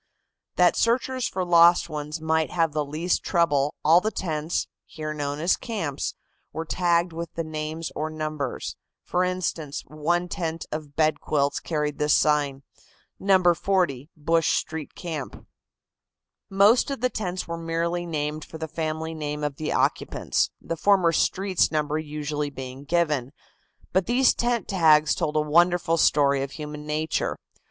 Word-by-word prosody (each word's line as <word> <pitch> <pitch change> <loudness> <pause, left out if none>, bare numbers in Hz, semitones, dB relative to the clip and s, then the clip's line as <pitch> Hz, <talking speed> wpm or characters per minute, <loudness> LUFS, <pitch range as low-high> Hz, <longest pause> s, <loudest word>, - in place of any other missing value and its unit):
That - - +4
searchers 250 +1 +1
for 185 -1 -2
lost 170 0 +6
ones 150 0 -5
might 160 0 +1
have 165 -3 0
the 150 0 0
least 155 +5 -1
trouble, 150 -5 +1
all 165 +3 +6
the 215 - 0
tents, 160 -5 -2 0.2
here 155 -2 -5
known 145 -1 -3
as 170 +4 +3
camps, 200 - -3 0.4
were 160 - -4
tagged 170 0 +1
with 170 0 -5
the 165 - -2
names 155 +1 -4
or 155 +1 -2
numbers. 155 -4 -4 0.3
For 180 - 0
instance, 175 -5 -2
one 170 +4 -1
tent 165 -2 -4
of 150 -2 -6
bed 155 -1 +2
quilts 140 -1 0
carried 150 -2 -2
this 150 0 +4
sign: 145 -2 +1 0.6
"No. 185 -3 +4
40 165 -7 0
Bush 165 +2 +1
Street 160 -2 -5
camp." 160 -6 -6 1.0
Most 200 +7 +4
of 275 -4 -4
the 255 - +2
tents 185 -4 -3
were 170 - -3
merely 170 +1 -2
named 150 -1 -3
for 160 - -10
the 160 0 -4
family 160 0 -3
name 150 -1 -4
of 145 -2 -2
the 155 - -3
occupants, - - 0
the 165 - -4
former 185 -1 +3
streets 185 +3 +1
number 155 0 0
usually 150 -1 -3
being 130 0 -8
given. 150 -5 0 0.6
But 190 0 +2
these 250 +2 +4
tent 240 -1 -1
tags 155 -5 +4
told 150 - -2
a 155 - +3
wonderful 170 +2 +3
story 140 -3 +3
of 135 0 -4
human 150 -1 -7
nature. 155 +1 -1
160 Hz, 155 wpm, -25 LUFS, 150-175 Hz, 1.0 s, lost